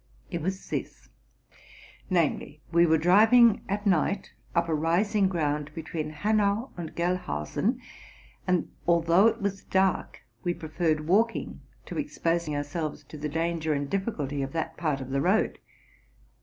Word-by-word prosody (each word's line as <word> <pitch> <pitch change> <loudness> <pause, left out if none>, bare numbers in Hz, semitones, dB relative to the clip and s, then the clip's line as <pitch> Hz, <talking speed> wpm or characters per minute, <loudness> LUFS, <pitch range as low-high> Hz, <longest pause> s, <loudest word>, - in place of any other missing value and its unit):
It 170 -2 -3
was 190 +4 -3
this; - - -5 1.0
namely, 160 -4 0
we 170 0 +5
were 160 0 +4
driving 215 +7 +6
at 205 +2 -2
night 190 +1 +1 0.2
up 170 0 +2
a 165 - 0
rising 185 +6 +2
ground 150 -4 -1
between 160 -1 -4
Hanau 210 - +1
and 170 -3 -7
Gelhausen, 175 - -1 0.7
and, 180 -1 +1 0.2
although 170 +4 +5
it 225 - -1
was 195 -1 -2
dark, 190 0 0 0.2
we 175 -1 0
preferred 155 -2 -1
walking 225 +6 +1 0.2
to - - -5
exposing 170 - -1
ourselves 145 +2 -3
to 155 - -8
the 150 +1 -3
danger 165 0 -1
and 140 -1 -3
difficulty 150 - -2
of 135 0 -4
that 160 0 -3
part 150 -5 -1
of 130 0 -7
the 135 0 +1
road. 190 +7 +1
170 Hz, 140 wpm, -27 LUFS, 155-195 Hz, 1.0 s, driving